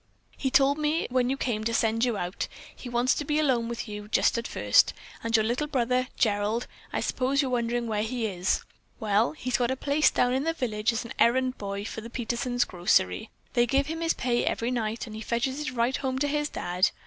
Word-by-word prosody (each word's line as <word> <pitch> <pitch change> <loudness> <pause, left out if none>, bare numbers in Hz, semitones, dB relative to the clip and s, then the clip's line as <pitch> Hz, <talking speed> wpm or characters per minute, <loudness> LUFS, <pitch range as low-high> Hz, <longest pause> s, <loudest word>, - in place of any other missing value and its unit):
"He 265 - -1
told 275 +2 +4
me 305 +2 +1
when 250 -1 +2
you 270 - 0
came 225 -5 -1
to 230 +1 0
send 225 0 +2
you 235 -4 0
out. 175 0 -3 0.3
He 250 - -8
wants 240 +2 +2
to - - -2
be 295 +1 0
alone 260 -6 +2
with 235 0 -4
you 210 0 -7
just 215 - +3
at 235 0 -2
first. - - +3 0.3
And 230 0 +1
your 220 -1 +4
little 250 +6 0
brother, 255 -2 +1
Gerald; 210 +2 +1 0.3
I - - -1
s'pose 275 +2 +1
you're 260 - -2
wondering 240 0 0
where 215 -2 -1
he 230 +1 -2
is. 185 -3 0 0.4
Well, 215 +3 +2
he's 255 -5 -1
got 240 -1 +1
a 260 - 0
place 285 +3 +3
down 250 0 +2
in 260 - +1
the 325 +1 0
village 225 -7 0
as 230 0 -3
errand 255 +2 +3
boy 200 0 -4
for 220 - -5
Peterson's 245 +1 -1
grocery. 100 - +1 0.2
They 240 0 +3
give 275 +3 +2
him 325 +3 -4
his 330 0 +1
pay 240 -1 0
every 235 +2 0
night, 230 -1 -2
and 215 -2 -9
he 220 - -6
fetches 240 +5 -1
it 300 -3 -3
right 245 +1 +1
home 260 -1 -2
to 290 +2 +1
his 295 0 0
Dad. 180 +2 +1
240 Hz, 220 wpm, -27 LUFS, 220-265 Hz, 0.4 s, told